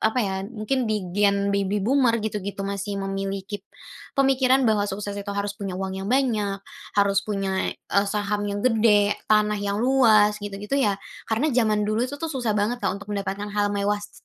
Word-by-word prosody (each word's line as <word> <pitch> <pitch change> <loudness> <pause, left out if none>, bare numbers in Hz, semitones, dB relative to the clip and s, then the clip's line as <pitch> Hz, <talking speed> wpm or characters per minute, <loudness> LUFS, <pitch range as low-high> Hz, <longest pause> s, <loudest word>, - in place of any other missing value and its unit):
apa 220 +3 +1
ya? 190 -1 -2
Mungkin 240 +2 -1
di 210 -3 -1
Gen 200 0 +2
Baby 200 0 0
Boomer 255 -2 +3
gitu-gitu 205 -2 -4
masih 200 +1 -3
memiliki, 195 +1 -4 0.6
pemikiran 265 -1 +4
bahwa 210 -3 +2
sukses 205 +1 -4
itu 200 - -9
harus 200 0 -1
punya 195 -2 -5
uang 190 0 -3
yang 195 - -4
banyak, 215 -6 0 0.3
harus 200 -1 +4
punya, 195 -2 -1
e 200 - 0
saham 205 0 -1
yang 205 +2 -3
gede, 210 -4 +4 0.2
tanah 210 -1 +3
yang 200 0 -1
luas 215 -5 +4
gitu-gitu 205 +7 -2
ya. 205 -5 +2 0.3
Karena 255 +7 +1
zaman 215 -4 +2
dulu 215 +2 0
itu 285 - -6
tuh 325 +3 -4
susah 240 -6 -1
banget 230 +4 0
Kak - - 0
untuk 205 +1 -8
mendapatkan 200 +1 -3
hal 205 0 +1
mewah 205 0 0
s 205 0 -13
205 Hz, 180 wpm, -24 LUFS, 200-220 Hz, 0.6 s, pemikiran